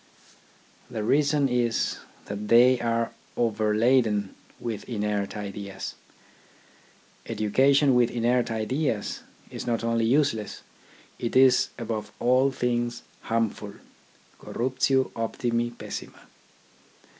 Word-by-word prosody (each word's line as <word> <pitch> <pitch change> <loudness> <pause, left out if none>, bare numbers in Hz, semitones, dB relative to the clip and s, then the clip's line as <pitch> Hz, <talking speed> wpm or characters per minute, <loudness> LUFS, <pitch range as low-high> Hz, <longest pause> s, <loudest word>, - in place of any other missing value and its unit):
The 110 -4 -4
reason 145 +4 +2
is, 120 -2 0 0.3
that 105 +1 -5
they 120 +3 +6
are 115 0 0 0.3
overladen 110 -1 +2 0.3
with 115 -2 -5
inert 105 -3 -2
ideas. 100 -1 -6 1.3
Education 135 +6 +3
with 120 -1 +4
inert 120 +1 +1
ideas 115 +1 -2 0.3
is - - -6
not 115 -1 0
only 115 -1 +1
useless: 120 -4 0 0.6
it 120 - -3
is, 130 -1 +5
above 110 -3 -4
all 130 +2 +3
things, 120 -2 -2 0.2
harmful 110 -2 -2 0.3
— - - -30
Corruptio 130 +2 0
optimi, 115 +1 -1
pessima. 120 - -8
115 Hz, 100 wpm, -26 LUFS, 110-125 Hz, 1.3 s, they